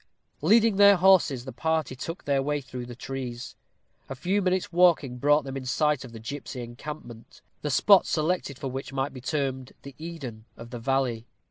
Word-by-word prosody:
Leading 215 Hz, +5 st, +4 dB
their 200 Hz, 0 st, +8 dB
horses, 175 Hz, -9 st, +4 dB
the 130 Hz, -, -6 dB
party 160 Hz, -4 st, -1 dB
took 165 Hz, +7 st, -6 dB
their 140 Hz, -1 st, +2 dB
way 145 Hz, +1 st, -1 dB
through 125 Hz, -2 st, -8 dB
the 120 Hz, -, -8 dB
trees. 125 Hz, -1 st, -6 dB, 0.5 s
A 135 Hz, -, -5 dB
few 185 Hz, +8 st, 0 dB
minutes' 185 Hz, -1 st, 0 dB
walking 165 Hz, -8 st, +3 dB
brought 145 Hz, +2 st, +4 dB
them 135 Hz, -1 st, -6 dB
in 135 Hz, -1 st, -5 dB
sight 150 Hz, +1 st, +1 dB
of 125 Hz, -, -10 dB
the 115 Hz, -, -9 dB
gipsy 130 Hz, +2 st, -6 dB
encampment, 120 Hz, -1 st, -10 dB, 0.2 s
the 150 Hz, -, -2 dB
spot 190 Hz, +9 st, +5 dB
selected 155 Hz, -3 st, -1 dB
for 135 Hz, -1 st, -5 dB
which 135 Hz, 0 st, -6 dB
might 135 Hz, +1 st, -2 dB
be 130 Hz, -, -9 dB
termed 135 Hz, -2 st, -3 dB
the 140 Hz, -, -10 dB
Eden 140 Hz, -10 st, -7 dB
of 115 Hz, +1 st, -11 dB
the 120 Hz, -, -6 dB
valley. 125 Hz, -2 st, -1 dB
135 Hz, 190 wpm, -26 LUFS, 125-160 Hz, 0.5 s, their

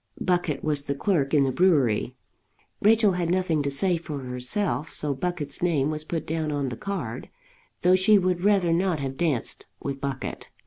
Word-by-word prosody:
Buckett 175 Hz, -6 st, 0 dB
was 150 Hz, -2 st, 0 dB
the 140 Hz, -, -2 dB
clerk 140 Hz, -3 st, 0 dB
in 145 Hz, -3 st, +4 dB
the 135 Hz, -, +1 dB
brewery. 130 Hz, -, +2 dB, 0.7 s
Rachel 215 Hz, 0 st, +5 dB
had 180 Hz, -2 st, -1 dB
nothing 180 Hz, -4 st, +1 dB
to 140 Hz, -, -1 dB
say 175 Hz, +6 st, +1 dB
for 155 Hz, -3 st, -6 dB
herself; 130 Hz, -, -2 dB
so 150 Hz, -2 st, -2 dB
Buckett's 150 Hz, -1 st, -3 dB
name 155 Hz, -5 st, +1 dB
was 155 Hz, 0 st, -4 dB
put 165 Hz, 0 st, -3 dB
down 160 Hz, -1 st, -2 dB
on 140 Hz, -2 st, -1 dB
the 120 Hz, -, -5 dB
card, 195 Hz, -, -5 dB, 0.5 s
though 180 Hz, +1 st, +5 dB
she 195 Hz, +3 st, +5 dB
would 180 Hz, -2 st, 0 dB
rather 195 Hz, -5 st, +3 dB
not 175 Hz, -2 st, +1 dB
have 135 Hz, -1 st, -4 dB
danced 150 Hz, -7 st, -2 dB
with 140 Hz, -1 st, -5 dB
Buckett. 140 Hz, -1 st, -4 dB
160 Hz, 180 wpm, -25 LUFS, 140-180 Hz, 0.7 s, Rachel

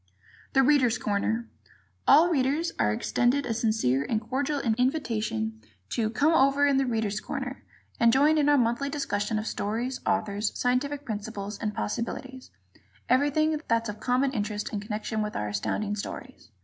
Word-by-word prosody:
"The 270 Hz, -, +5 dB
Readers' 260 Hz, -4 st, +4 dB
Corner" 220 Hz, +3 st, -1 dB, 0.6 s
All 320 Hz, +6 st, +7 dB
readers 295 Hz, +3 st, +1 dB
are 105 Hz, -, +3 dB
extended 240 Hz, -, +1 dB
a 235 Hz, -, -1 dB
sincere 215 Hz, -, +1 dB
and 215 Hz, +9 st, -1 dB
cordial 270 Hz, +6 st, -2 dB
invitation 220 Hz, -, -1 dB, 0.3 s
to 220 Hz, -2 st, 0 dB
"come 290 Hz, +9 st, +2 dB
over 275 Hz, -1 st, +4 dB
in 280 Hz, -1 st, +3 dB
'The 270 Hz, -1 st, +1 dB
Readers' 220 Hz, -3 st, -1 dB
Corner'" -, -, -5 dB, 0.4 s
and 235 Hz, 0 st, +5 dB
join 295 Hz, +5 st, +4 dB
in 290 Hz, -1 st, +3 dB
our 290 Hz, -, +5 dB
monthly 240 Hz, +3 st, +1 dB
discussion 215 Hz, -7 st, -1 dB
of 215 Hz, -, -3 dB
stories, 235 Hz, +5 st, -2 dB
authors, 205 Hz, +1 st, -1 dB
scientific 280 Hz, +3 st, 0 dB
principles 210 Hz, -1 st, -5 dB
and 210 Hz, -1 st, -3 dB
possibilities 255 Hz, +4 st, -4 dB, 0.6 s
everything 295 Hz, +3 st, +2 dB
that's 230 Hz, -1 st, +1 dB
of 210 Hz, -, -6 dB
common 260 Hz, +2 st, +1 dB
interest 210 Hz, -3 st, -3 dB
in 210 Hz, -, -1 dB
connection 215 Hz, +1 st, -3 dB
with 210 Hz, 0 st, -3 dB
our 105 Hz, -, -2 dB
Astounding 205 Hz, -, -2 dB
Stories. 235 Hz, -, -8 dB
235 Hz, 155 wpm, -27 LUFS, 210-275 Hz, 0.6 s, All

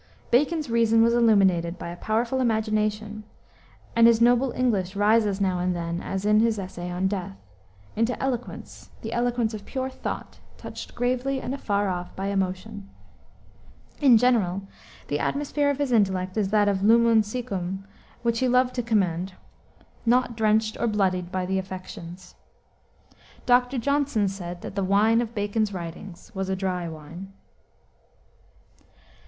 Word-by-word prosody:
Bacon's 300 Hz, +5 st, +2 dB
reason 230 Hz, -1 st, +3 dB
was 235 Hz, 0 st, +3 dB
illuminated 190 Hz, -7 st, +3 dB
by 170 Hz, -, -6 dB
a 170 Hz, -, -6 dB
powerful 230 Hz, +7 st, -1 dB
imagination, 215 Hz, -2 st, -1 dB, 0.7 s
and 230 Hz, 0 st, +7 dB
his 230 Hz, -1 st, +5 dB
noble 245 Hz, +2 st, +4 dB
English 205 Hz, -7 st, 0 dB
rises 205 Hz, -1 st, +3 dB
now 185 Hz, -2 st, +1 dB
and 180 Hz, 0 st, 0 dB
then, 170 Hz, 0 st, -3 dB
as 195 Hz, +1 st, -4 dB
in 210 Hz, 0 st, +4 dB
his 225 Hz, -1 st, +2 dB
essay 185 Hz, -2 st, -6 dB
On 180 Hz, +2 st, 0 dB
Death, 185 Hz, -, -4 dB, 0.6 s
into 230 Hz, +3 st, 0 dB
eloquence 250 Hz, -2 st, -5 dB
the 225 Hz, +1 st, -4 dB
eloquence 240 Hz, -2 st, 0 dB
of 210 Hz, -2 st, -6 dB
pure 260 Hz, +3 st, -4 dB
thought, -, -, -6 dB, 0.2 s
touched -, -, -9 dB
gravely 255 Hz, +2 st, 0 dB
and 255 Hz, -, -4 dB
afar 205 Hz, -7 st, -1 dB
off 180 Hz, -1 st, -4 dB
by 195 Hz, +1 st, -3 dB
emotion. 195 Hz, +1 st, -3 dB, 1.1 s
In 265 Hz, -6 st, +7 dB
general, 215 Hz, -6 st, +2 dB, 0.4 s
the 145 Hz, -, -1 dB
atmosphere 290 Hz, 0 st, 0 dB
of 285 Hz, -, 0 dB
his 285 Hz, -3 st, -1 dB
intellect 190 Hz, -4 st, +1 dB
is 210 Hz, -3 st, 0 dB
that 205 Hz, -2 st, +2 dB
lumen 230 Hz, +1 st, +5 dB
siccum 195 Hz, -4 st, -4 dB, 0.4 s
which 235 Hz, -1 st, +1 dB
he 260 Hz, -, +2 dB
loved 250 Hz, 0 st, +3 dB
to 245 Hz, -, -1 dB
commend, 190 Hz, -5 st, 0 dB, 0.7 s
"not 245 Hz, 0 st, +2 dB
drenched 220 Hz, 0 st, +1 dB
or 235 Hz, -, +1 dB
bloodied 185 Hz, -4 st, 0 dB
by 185 Hz, -1 st, -1 dB
the 190 Hz, +1 st, 0 dB
affections." 185 Hz, -1 st, -9 dB, 1.1 s
Dr. 250 Hz, +1 st, +3 dB
Johnson 280 Hz, -4 st, +1 dB
said 180 Hz, -2 st, -6 dB
that -, -, -6 dB
the 195 Hz, 0 st, -1 dB
wine 210 Hz, +4 st, +3 dB
of 235 Hz, 0 st, -5 dB
Bacon's 205 Hz, +1 st, 0 dB
writings 175 Hz, +1 st, -8 dB
was 190 Hz, -1 st, -3 dB
a 190 Hz, -, 0 dB
dry 180 Hz, -3 st, -2 dB
wine. 165 Hz, +5 st, -10 dB
210 Hz, 150 wpm, -25 LUFS, 190-235 Hz, 1.1 s, and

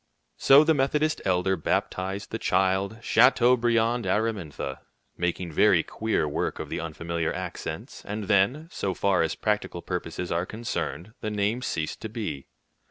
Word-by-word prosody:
So 140 Hz, +2 st, +7 dB
the 160 Hz, +1 st, +4 dB
Methodist 150 Hz, +2 st, +1 dB
elder 95 Hz, 0 st, +2 dB
baptized 95 Hz, +3 st, -2 dB
the -, -, -3 dB
child 95 Hz, +3 st, +1 dB
"Chateaubriand 120 Hz, -1 st, +4 dB
Aramintha," 95 Hz, -10 st, -2 dB, 0.4 s
making 90 Hz, 0 st, -2 dB
very -, -, +4 dB
queer 110 Hz, -8 st, -1 dB
work 75 Hz, -, -2 dB
of -, -, -6 dB
the -, -, -3 dB
unfamiliar 85 Hz, 0 st, -3 dB
accents; 90 Hz, -1 st, -6 dB
and 105 Hz, +1 st, -4 dB
then, 105 Hz, +10 st, +2 dB
so 95 Hz, -2 st, -2 dB
far 95 Hz, -1 st, +2 dB
as 80 Hz, -, 0 dB
practical 105 Hz, -5 st, -2 dB
purposes 90 Hz, 0 st, -4 dB
are 85 Hz, +2 st, 0 dB
concerned, 110 Hz, -, -4 dB
the 110 Hz, -, -2 dB
name 105 Hz, +3 st, 0 dB
ceased 80 Hz, -10 st, -3 dB
to 110 Hz, -, -5 dB
be. 100 Hz, -, -5 dB
100 Hz, 145 wpm, -26 LUFS, 85-115 Hz, 0.4 s, So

